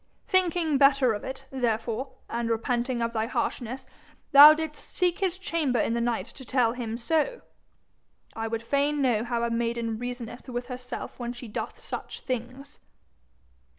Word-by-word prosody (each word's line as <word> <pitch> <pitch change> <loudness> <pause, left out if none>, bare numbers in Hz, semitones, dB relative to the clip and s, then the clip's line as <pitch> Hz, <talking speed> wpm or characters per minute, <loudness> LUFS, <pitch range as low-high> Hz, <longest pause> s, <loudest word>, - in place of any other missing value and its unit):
'Thinking 345 -6 +2
better 275 -4 +5
of 205 - -5
it, 265 +1 -6
therefore, 240 0 -1
and 235 0 -2
repenting 240 +2 0
of 230 0 -2
thy 220 0 0
harshness, 255 +1 -3 0.5
thou 285 +2 +12
didst 310 -1 -4
seek 360 -2 +1
his 375 -2 0
chamber 330 - 0
in 225 - +1
the 235 - 0
night 235 -1 0
to 265 - -12
tell 245 -2 +2
him 230 -2 -4
so? 320 - 0 0.9
I 225 0 -2
would 225 0 -3
fain 285 +4 +1
know 240 -5 +2
how 235 -1 -1
a 235 - 0
maiden 230 -1 -1
reasoneth 245 0 -6
with 245 0 -4
herself 250 0 -7
when 240 0 -3
she 245 0 -9
doth 210 - -5
such - - -6
things.' 255 +3 -5
245 Hz, 160 wpm, -27 LUFS, 235-280 Hz, 0.9 s, thou